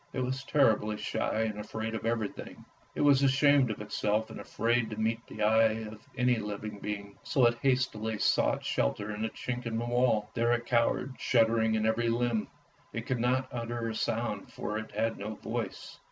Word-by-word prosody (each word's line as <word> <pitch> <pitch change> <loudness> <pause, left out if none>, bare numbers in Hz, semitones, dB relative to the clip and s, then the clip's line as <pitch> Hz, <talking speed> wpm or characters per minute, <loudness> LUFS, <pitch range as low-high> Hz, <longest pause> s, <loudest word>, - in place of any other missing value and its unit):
It 130 - -1
was 130 +1 -2
terribly 110 -7 +3
shy 110 - -1
and 110 -2 -3
afraid 110 +1 -4
of 110 0 -3
everything. 115 -3 -3 0.3
It - - -1
was 140 -2 +5
ashamed 140 -1 +4
of 105 - -4
itself 105 +1 -1
and - - -8
afraid 120 0 0
to 110 - -6
meet 110 +1 +1
the - - -4
eye 110 +1 +4
of 110 0 -10 0.2
any 125 0 +3
living 105 0 -5
being, 100 -1 -6
so 130 - +2
it 120 0 +2
hastily 120 -5 +1
sought - - +2
shelter 100 +12 -1
in 105 +1 -4
a - - -1
chink 125 +2 -4
in 115 -1 -2
the 120 - -2
wall. 120 -3 +1
There 120 0 +2
it 120 0 -1
cowered, 125 +2 +1
shuddering 115 -2 +3
in 110 0 +1
every 115 +1 +2
limb; 115 -2 0 0.4
it 115 0 -5
could 125 -2 -1
not 130 +2 +1
utter 120 -1 -3
a - - -3
sound, 110 -2 -2
for 105 0 -3
it 110 - -7
had 115 0 -1
no 105 +2 -4
voice. - - -5
115 Hz, 195 wpm, -30 LUFS, 110-120 Hz, 0.4 s, was